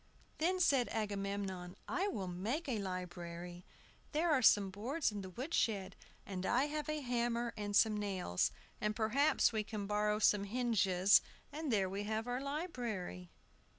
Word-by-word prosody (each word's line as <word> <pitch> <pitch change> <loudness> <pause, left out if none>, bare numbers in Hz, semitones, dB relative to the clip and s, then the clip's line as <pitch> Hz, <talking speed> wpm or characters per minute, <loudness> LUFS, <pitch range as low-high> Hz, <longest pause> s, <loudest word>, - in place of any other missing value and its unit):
Then 360 +4 +2
said 275 -8 +3
Agamemnon, 195 -3 -3
"I 385 +3 0
will 200 - -3
make 215 - -2
a 235 -5 -1
library. 175 -2 -6 0.5
There 325 +3 +2
are 280 -4 +4
some 205 -4 +5
boards 245 - -1
in 205 -1 -5
the 190 - -7
wood 260 - -6
shed, 200 -4 0 0.3
and 185 -2 -4
I 245 +7 +3
have 300 0 -3
a 305 0 -1
hammer 240 -2 -1
and 205 -1 -3
some 215 +1 +5
nails, 185 - 0 0.3
and 210 0 0
perhaps 235 +5 +3
we 215 -1 0
can 210 -1 -5
borrow 210 +1 +1
some 205 -1 +3
hinges, 200 -5 +4 0.3
and 305 -2 -3
there 200 -4 +2
we 200 +2 -4
have 220 +1 -1
our 245 +1 -2
library!" 245 - -4
210 Hz, 160 wpm, -36 LUFS, 195-255 Hz, 0.5 s, some